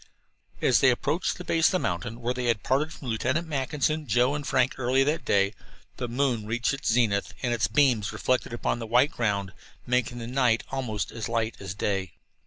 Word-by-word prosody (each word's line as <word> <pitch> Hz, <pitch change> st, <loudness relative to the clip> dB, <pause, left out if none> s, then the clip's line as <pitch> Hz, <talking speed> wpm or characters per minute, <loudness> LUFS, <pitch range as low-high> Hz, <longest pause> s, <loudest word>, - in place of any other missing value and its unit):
As 125 Hz, -, +5 dB
they 130 Hz, -, +5 dB
approached 145 Hz, +7 st, 0 dB
the 180 Hz, -, -7 dB
base 165 Hz, -2 st, +3 dB
of -, -, 0 dB
the -, -, +3 dB
mountain 115 Hz, -, -3 dB
where 120 Hz, +1 st, 0 dB
they 125 Hz, 0 st, -3 dB
had 115 Hz, -3 st, +1 dB
parted 145 Hz, +4 st, +1 dB
from 140 Hz, -, -10 dB
Lieutenant 130 Hz, +9 st, 0 dB
Mackinson, 150 Hz, +1 st, -1 dB
Joe, 120 Hz, +5 st, +3 dB
and 145 Hz, -1 st, -4 dB
Frank 130 Hz, -1 st, +1 dB
early 130 Hz, +2 st, +3 dB
that 150 Hz, +4 st, 0 dB
day, 100 Hz, 0 st, +2 dB, 0.4 s
the 125 Hz, -, -3 dB
moon 120 Hz, -3 st, 0 dB
reached 120 Hz, +4 st, 0 dB
its 135 Hz, -3 st, -1 dB
zenith, 110 Hz, -4 st, +1 dB
and 120 Hz, -2 st, +1 dB
its 115 Hz, -2 st, +1 dB
beams, 120 Hz, -4 st, +2 dB
reflected 130 Hz, -2 st, 0 dB
upon 120 Hz, 0 st, -1 dB
the 115 Hz, -, -5 dB
white 125 Hz, +6 st, +4 dB
ground, 100 Hz, -4 st, -1 dB, 0.3 s
made 125 Hz, -1 st, +1 dB
the 120 Hz, -1 st, -7 dB
night 125 Hz, -2 st, +2 dB
almost 115 Hz, -7 st, -3 dB
as 115 Hz, -2 st, -5 dB
light 115 Hz, -1 st, -1 dB
as 95 Hz, -1 st, -6 dB
day. 95 Hz, -5 st, -2 dB
120 Hz, 200 wpm, -27 LUFS, 110-135 Hz, 0.4 s, As